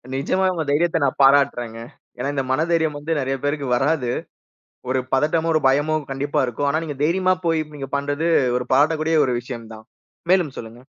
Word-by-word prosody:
நிஜமா 145 +8 0
உங்க 165 -3 -2
தைரியத்த 165 +3 +2
நான் 135 - 0
பாராட்றேங்கே. 120 -5 +3 0.3
ஏன்னா 140 - -2
இந்த 135 -2 -1
மன 135 +4 +1
தைரியம் 160 -3 +1
வந்து 150 +2 -2
நெறைய 135 0 -1
பேருக்கு 145 -1 -1
வராது. 135 -1 0 0.8
ஒரு 130 0 +1
பதட்டமோ, 160 +4 +1
ஒரு 155 - +2
பயமோ 145 +4 +2 0.2
கண்டிப்பா 140 +2 -1
இருக்கும். 135 +4 -2
ஆனா 155 +3 0
நீங்கத் 145 -2 -6
தைரியமா 185 +3 +2
போய் 165 -1 +2
நீங்கப் 135 -1 -5
பண்றது 145 +3 -1 0.3
ஒரு 125 - -3
பாராட்டக்கூடிய 155 +3 +2
ஒரு 125 - -1
விஷயம்தான். 115 -3 -9 0.5
மேலும் 175 -8 +2
சொல்லுங்க. 115 +2 -9
145 Hz, 170 wpm, -21 LUFS, 130-160 Hz, 0.8 s, பாராட்றேங்கே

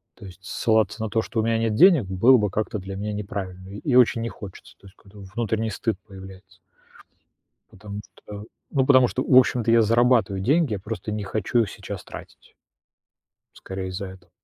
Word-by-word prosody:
То - - -13
есть 95 0 -12
ссылаться 110 +2 0
на 110 - -3
то, 110 +1 0
что 115 - -2
у - - -2
меня 115 0 +1
нет 115 -2 0
денег, 165 - +6
было 115 +8 +4
бы 105 -2 0
как-то 110 -1 -3
для 95 +1 -7
меня 105 +1 -4
неправильно 95 -2 -6
и 105 +6 -3
очень 120 -2 +4
не 115 - -3
хочется. 100 -3 -12
То 100 - -16
есть 95 - -18
какой-то 100 0 -17 0.2
внутренний 110 -1 -1
стыд 110 0 -2
появляется. 95 -1 -13 1.1
Потому 100 +1 -9
что 105 0 -11 0.3
ну, 135 -2 +1
потому 130 -3 +5
что, 130 - -3
в 130 - +1
общем-то, 125 -2 +4
я 115 -1 +5
зарабатываю 115 -3 +2
деньги, 145 - +2
я - - -4
просто 105 +2 -6
не 105 -1 -4
хочу 110 +4 -1
их 105 - -4
сейчас - - -8
тратить. - - -13 1.0
Скорее 95 -1 -6
из-за 95 +2 -5
этого. 95 -2 -13
105 Hz, 190 wpm, -23 LUFS, 95-115 Hz, 1.1 s, денег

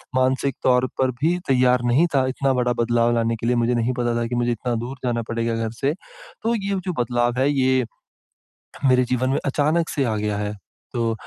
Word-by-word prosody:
मानसिक 130 +1 +1
तौर 125 0 +4
पर 130 -1 +2
भी 170 +4 +2
तैयार 125 -1 +3
नहीं 125 +8 +4
था 130 -1 +3
इतना 135 +1 0
बड़ा 125 -1 +1
बदलाव 120 0 +2
लाने 115 0 +1
के 115 +1 -4
लिए, 125 - +2
मुझे 120 +1 +1
नहीं 120 +2 0
पता 120 -1 0
था 120 - 0
कि 120 - -3
मुझे 120 0 +1
इतना 120 +1 -2
दूर 130 +3 -6
जाना 120 -1 0
पड़ेगा 115 0 -1
घर 115 -1 -2
से, 140 +2 +2
तो - - -6
ये 200 -2 -2
जो 180 - -1
बदलाव 120 0 0
है 135 +2 +3
ये, 130 -2 +2 1.0
मेरे 130 -1 +4
जीवन 125 +1 0
में 135 - +1
अचानक 155 +4 +1
से 140 - -1
आ 110 -3 0
गया 105 -1 -2
है। 105 0 -3 0.4
तो 115 -1 0
125 Hz, 215 wpm, -22 LUFS, 120-135 Hz, 1.0 s, तौर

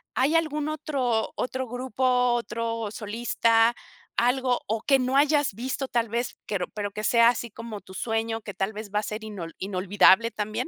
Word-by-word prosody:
hay 275 +6 +2
algún 305 -2 +1
otro 270 -7 -1
otro 260 0 -3
grupo, 250 0 +1
otro 230 -2 -2
solista, 230 +1 +2 0.4
algo 250 +1 +2
o 220 +1 -1
que 275 +2 +4
no 255 +1 0
hayas 290 -4 +3
visto 260 +4 -3
tal 235 -3 0
vez, 235 +1 -2
pero 195 -4 -2
pero 205 -1 -4
que 210 +2 -6
sea 235 +2 +5
así 235 -2 -2
como 225 -2 -8
tu 190 - -14
sueño, 225 +2 -2
que 205 -2 -7
tal 195 +2 -1
vez 210 0 -7
va 210 - +1
a 215 - -4
ser 215 +1 -5
inol 185 -7 -7
inolvidable 195 +3 +4
también? 215 +7 -3
230 Hz, 180 wpm, -26 LUFS, 215-255 Hz, 0.4 s, sea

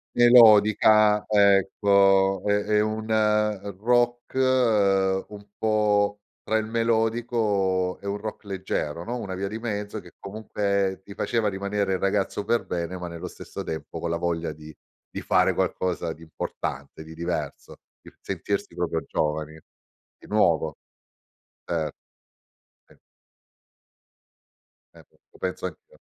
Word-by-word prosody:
Melodica, 110 -3 +6
ecco, 100 -1 +4
è 105 - +2
è 105 0 +2
un 110 +1 -2 0.7
rock 120 +2 +1 0.9
un 105 -1 -11
po' 105 -2 +1 0.2
tra 110 - 0
il 110 -1 0
melodico 110 -5 0
e 100 - -6
un 100 - -1
rock 105 +1 -7
leggero 90 -5 -3
no, 120 +2 -4
una 95 -5 -5
via 95 +1 -3
di 105 +3 -5
mezzo 105 -2 -4
che 90 - -16
comunque 100 -2 -2
ti 100 - -11
faceva 115 0 0
rimanere 100 0 -2
il 95 - -1
ragazzo 100 +1 0
per 120 +2 0
bene, 90 +1 -3
ma 90 - -6
nello 85 -1 -7
stesso - - -8
tempo 80 - -6
con 85 - -3
la 85 - 0
voglia 85 -1 -2
di 75 0 -13 0.4
di - - -5
fare - - +3
qualcosa 90 -2 -1
di 80 - -14
importante, 80 -1 -6
di 80 +1 -11
diverso, 80 -3 -5 0.3
il - - -16
sentirsi 100 0 -3
proprio 85 -2 -1
giovani, 75 +1 -2 0.6
di - - -16
nuovo. 85 -7 +2 0.9
Cer 80 -3 -1 1.0
Sì. - - -22 2.0
Certo, - - -20
lo - - -19
penso 95 0 -3
anch'io. 90 - -11
100 Hz, 130 wpm, -25 LUFS, 90-110 Hz, 2.0 s, Melodica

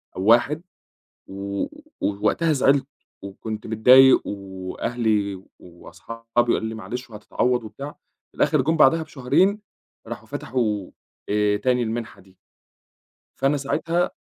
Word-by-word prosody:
أو 95 - -4
1 120 +8 +4 0.7
و 100 +1 -4 0.3
ووقتها 130 +11 +1
زعِلت 135 -1 +3 0.4
وكنت 105 +2 -7
متضايق 125 +4 +6
وأهلي 100 +1 -2 0.2
وأصحابي 115 +6 -12
قالوا 120 0 +4
لي: 110 0 -4
"معلش 125 +3 -7
وهتتعوّض." 115 +3 -1
وبتاع، 125 +7 -7 0.4
في - - -25
الآخِر 150 - +2
جُم 160 +5 +1
بعدها 160 +2 +5
بشهرين 170 +9 +1 0.5
راحوا - - -8
فتَحوا 110 -6 -2 0.4
آآ 105 0 +2
تاني 125 +3 +1
المنحة 115 0 -4
دي 95 0 -22 1.0
فأنا 140 +2 +2
ساعتها 165 +5 0
115 Hz, 115 wpm, -23 LUFS, 105-135 Hz, 1.0 s, متضايق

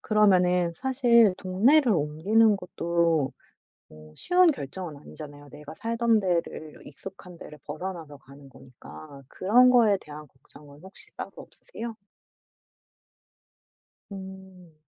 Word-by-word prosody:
그러면은 180 -5 +2
사실 235 -2 +3
동네를 230 +8 +3
옮기는 195 +8 +2
것도 170 -5 -1 0.6
어 75 0 -16
쉬운 360 -1 +3
결정은 160 - -7
아니잖아요. 145 0 -12
내가 150 +2 -11
살던 230 +1 +1
데를 170 -5 -3
익숙한 185 -2 -11
데를 150 - -12
벗어나서 155 -1 -7
가는 140 +1 -17
거니까 125 - -14
그런 240 - +4
거에 225 -5 +4
대한 150 0 -11
걱정은 140 +2 -18
혹시 190 +1 -13
따로 - - -6
없으세요? 235 - -10 2.2
음. 190 -3 -11
180 Hz, 255 characters per minute, -26 LUFS, 150-215 Hz, 2.2 s, 그런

